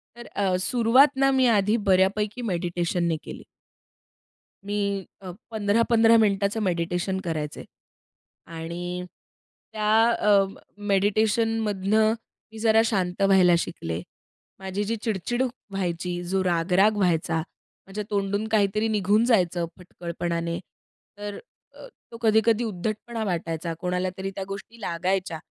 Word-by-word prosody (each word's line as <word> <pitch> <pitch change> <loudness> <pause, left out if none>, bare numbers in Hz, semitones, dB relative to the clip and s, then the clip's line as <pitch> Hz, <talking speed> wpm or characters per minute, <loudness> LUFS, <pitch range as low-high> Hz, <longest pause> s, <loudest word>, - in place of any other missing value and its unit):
तर 240 0 -10
अ, 195 -3 -1
सुरुवात 245 +5 +4
ना 270 - +5
मी 260 - +4
आधी 210 +3 +2
बऱ्यापैकी 200 +5 +2
मेडिटेशननी 175 -1 -1
केली. - - -9 1.2
मी 205 +1 -2 0.4
अ, 185 - -7 0.2
15-15 225 +2 +4
मिनिटाचं 200 -1 +2
मेडिटेशन 180 +1 -1
करायचे 155 -3 -4 0.8
आणि 175 +2 -5 0.7
त्या 215 -1 -1 0.2
अ, 205 -3 +4 0.5
मेडिटेशनमधनं 215 +1 +2 0.4
मी 220 - -10
जरा 220 0 +4
शांत 190 -4 -1
व्हायला 190 -3 +5
शिकले. 85 - -4 0.6
माझी 190 +1 -3
जी 225 +3 -1
चिड-चिड 225 +3 -1 0.3
व्हायची, 175 -2 -2
जो 190 +2 0
राग-राग 185 +4 +2
व्हायचा, 165 -3 +1 0.5
माझ्या 205 +2 -5
तोंडून 200 +1 -1
काहीतरी 215 0 +1
निघून 210 +1 +2
जायचं 180 -7 +2
फटकळपणाने. 170 -1 -4 0.6
तर 205 0 -6 0.4
अ, - - -11 0.2
तो 230 - -8
कधी-कधी 220 +1 +3
उद्धटपणा 220 +3 -4
वाटायचा. 165 -2 -3
कोणाला 180 0 -1
तरी 190 0 -4
त्या 195 - -3
गोष्टी 200 +4 -8
लागायच्या. 180 -1 -1
195 Hz, 115 wpm, -25 LUFS, 180-220 Hz, 1.2 s, ना